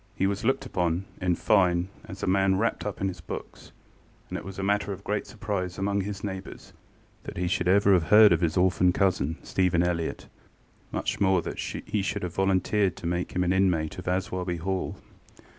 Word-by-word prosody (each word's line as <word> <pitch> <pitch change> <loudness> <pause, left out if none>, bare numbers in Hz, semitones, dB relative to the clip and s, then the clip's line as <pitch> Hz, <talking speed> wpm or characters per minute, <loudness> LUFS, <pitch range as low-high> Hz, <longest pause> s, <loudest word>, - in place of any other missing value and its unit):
He 95 - +1
was 100 +2 -1
looked 135 +3 +1
upon, 90 -5 -1 0.2
in 90 -1 +2
fine, 90 -1 +2 0.2
as - - -9
a - - +2
man 95 0 +3
wrapped 115 0 -1
up 100 - -5
in 95 - +1
his 90 -3 -5
books, - - -8 0.6
and - - -5
it - - -11
was 95 -1 -8
a 95 - -3
matter 100 +1 +1
of 100 0 -7
great 105 0 -2
surprise 100 -5 -4
among 100 +1 0
his 100 0 -5
neighbours 95 -2 -7 0.5
that - - -7
he 90 0 0
should 90 0 0
ever 100 +1 +5
have 85 -3 +3
heard 105 +2 +7
of - - +1
his 85 -1 +1
orphan 90 0 +3
cousin, 85 -5 +1
Stephen 90 -2 +1
Elliott, 85 -2 -2 0.7
much - - -2
more 95 -3 +3
that - - -6
he 105 - -3
should 100 +1 -2
have 90 -2 -4
volunteered 95 +1 +1
to - - -10
make 85 +1 -2
him 90 - +2
an 90 +1 +2
inmate 90 -4 +1
of 90 - -9
Aswarby 90 -1 -1
Hall. 95 +3 -2
95 Hz, 200 wpm, -27 LUFS, 90-100 Hz, 0.7 s, heard